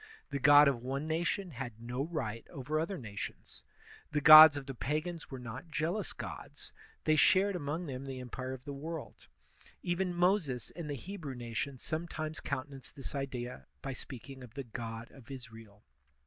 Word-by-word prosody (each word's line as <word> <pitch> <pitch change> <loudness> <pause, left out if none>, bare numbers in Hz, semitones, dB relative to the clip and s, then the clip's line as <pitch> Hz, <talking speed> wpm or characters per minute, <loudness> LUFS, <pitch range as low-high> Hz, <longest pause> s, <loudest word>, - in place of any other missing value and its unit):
The 140 - -1
god 145 +1 +8
of 130 -4 +1
one 135 +4 -3
nation 170 +3 -1
had 120 -4 -6
no 120 +4 -3
right 115 -9 -3
over 145 +4 -2
other 170 +4 -2
nations. 105 -8 -7 0.5
The 150 - +1
gods 155 0 +11
of 140 - -5
the 135 - -5
pagans 155 +7 -3
were 135 - -6
not 125 +6 -8
jealous 165 +7 -1
gods; - - -8 0.3
they 155 - +4
shared 190 +6 +5
among 160 +1 -3
them 135 -2 -5
the 135 -1 -5
empire 130 +1 -5
of 130 -1 -9
the 145 - -5
world; 160 +2 -7 0.6
even 180 +1 0
Moses 175 - +1
and 165 -4 -6
the 145 - -2
Hebrew 160 -2 -6
nation 120 +3 -4
sometimes 155 +2 -3
cotmte 140 -1 -3
nanced 135 +1 -10
this 135 0 -6
idea 130 -3 -4 0.2
by 135 - -3
speaking 130 +1 -9
of 125 -2 -12
the 140 - -4
god 115 -1 -6
of 135 -2 -15
Israel. 115 -5 -10
140 Hz, 175 wpm, -33 LUFS, 125-160 Hz, 0.6 s, gods